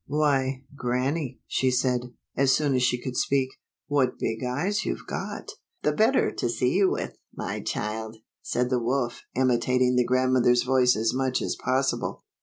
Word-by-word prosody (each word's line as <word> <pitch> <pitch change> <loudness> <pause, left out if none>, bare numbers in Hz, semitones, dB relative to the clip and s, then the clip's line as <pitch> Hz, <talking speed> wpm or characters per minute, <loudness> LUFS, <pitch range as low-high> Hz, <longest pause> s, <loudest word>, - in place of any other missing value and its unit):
" - - -57
Why, 135 -3 +1
Grannie," 130 +2 -2
she 130 - +1
said, 125 -1 0 0.2
as 135 -1 +3
soon 145 0 +2
as 130 - +2
she 125 0 +2
could 125 0 -5
speak, 135 0 +1 0.2
" - - -67
what 135 -3 +1
big 115 +2 -2
eyes 175 +12 -1
you've - - -4
got - - -5 0.2
!" - - -46
"The - - +3
better 230 +5 +3
to 120 - -2
see 125 +11 +2
with, 190 - -1 0.2
my - - -4
child," 110 +1 -4 0.2
said 125 +1 -1
the 125 -1 +2
wolf, 120 0 -1
imitating 125 0 +2
the 125 - +5
grandmother's 130 -1 +3
voice 125 -1 +4
as 110 +1 +1
much 130 0 0
as - - -2
possible. 130 +1 -1
130 Hz, 175 wpm, -26 LUFS, 125-135 Hz, 0.2 s, the